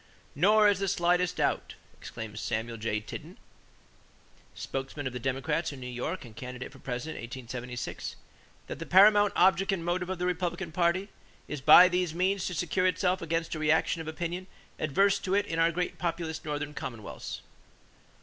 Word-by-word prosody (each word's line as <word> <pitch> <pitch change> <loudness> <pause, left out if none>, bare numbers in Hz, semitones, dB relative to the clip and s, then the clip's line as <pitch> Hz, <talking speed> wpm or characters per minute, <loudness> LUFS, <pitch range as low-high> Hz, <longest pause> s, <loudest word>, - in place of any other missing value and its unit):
"Nor 210 +7 +5
is 200 -2 +3
there 200 - 0
the 195 - +1
slightest 175 0 +2
doubt," - - -1 0.2
exclaimed 110 -1 -8
Samuel 115 +1 -3
J. 110 -1 -2
Tilden, 105 - -9 1.2
spokesman 135 +2 -5
of 130 - -3
the 125 - -4
Democrats 135 +6 -1
in 140 - -9
New 125 - -8
York 125 +7 -4
and 110 -2 -13
candidate 125 +2 -7
for - - -15
President 125 +5 -5
in 120 +2 -7
1876, 125 0 -5 0.5
"that - - -7
the 165 - -6
paramount 205 +2 +6
object 190 +2 +4
and 175 -4 -2
motive 180 +1 -1
of 190 - -2
the 180 - -2
Republican 180 0 -2
party 175 +4 +1 0.4
is 150 -2 -5
by 155 +6 +9
these 180 -2 -1
means 190 +2 +1
to 180 - -4
secure 180 +3 +1
itself 185 0 +1
against 165 0 -2
a 155 - -4
reaction 160 +1 +2
of 160 - -8
opinion 175 +3 -4 0.3
adverse 195 +7 +2
to 190 0 -1
it 205 0 +2
in 165 -4 -3
our 165 +1 +4
great 180 +1 -3
populous 165 -2 -3
Northern 150 -1 -3
commonwealths.... 115 -7 -6
165 Hz, 180 wpm, -29 LUFS, 135-185 Hz, 1.2 s, by